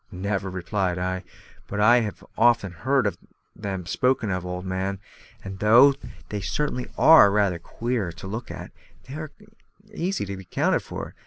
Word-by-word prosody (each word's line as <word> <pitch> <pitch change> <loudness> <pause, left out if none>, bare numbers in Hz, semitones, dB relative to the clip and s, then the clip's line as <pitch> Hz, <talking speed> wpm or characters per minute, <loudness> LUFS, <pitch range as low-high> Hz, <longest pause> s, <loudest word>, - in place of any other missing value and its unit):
"Never," 95 +1 -2
replied 95 0 -2
I, 95 +1 -2 0.4
"but 105 - -4
I 120 +4 +6
have 105 -4 -4
often 115 -4 +3
heard 115 - 0 0.4
them 95 -3 -5
spoken 115 +3 0
of, 90 -1 -2
old 90 +1 -5
man; 95 +1 -2 0.4
and 95 -1 -7
though 120 +7 +7 0.4
they 105 -1 -3
certainly 125 +3 -2
are 160 -10 +8
rather 100 -4 +1
queer 115 0 -3
to 80 - -11
look 110 +5 -5
at, - - -8 0.4
they 130 - -9
are 155 +1 -5 0.6
easily 175 - -2
accounted 95 -2 0
for. - - -7
100 Hz, 150 wpm, -24 LUFS, 95-120 Hz, 0.6 s, are